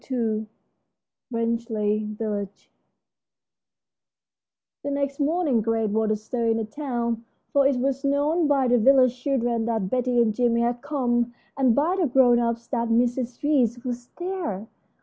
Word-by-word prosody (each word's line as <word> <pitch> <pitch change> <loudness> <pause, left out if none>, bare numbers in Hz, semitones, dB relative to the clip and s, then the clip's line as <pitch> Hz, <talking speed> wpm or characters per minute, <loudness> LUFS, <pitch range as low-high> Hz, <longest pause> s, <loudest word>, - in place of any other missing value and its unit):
II 220 -4 -1 0.8
RANGELEY 220 -3 -1
VILLAGE 205 -3 -5 2.1
The 285 - -4
next 280 0 -2
morning 295 -5 +1
great 225 -1 0
was 220 +1 +1
the 215 - +2
stir 230 +2 -3
in 225 0 +2
the 225 - -2
town, 235 -2 -3 0.3
for 280 -1 +5
it 275 - +1
was 270 +2 -1
known 295 +4 +1
by 275 -3 +2
the 245 0 +3
village 255 +1 +5
children 240 -4 0
that 220 -5 -1
Betty 250 -1 +1
and 225 -2 +3
Jimmie 235 +1 +1
had 240 0 -1
come, 240 -4 -1 0.2
and 260 -4 +3
by 335 +6 +1
the 340 - +2
grown 245 -2 +4
ups 235 0 -1
that 235 -3 -1
Mrs. 245 +2 0
Reece 250 -5 +1
was 245 -1 -4
there. 350 - -4
240 Hz, 150 wpm, -24 LUFS, 225-275 Hz, 2.1 s, for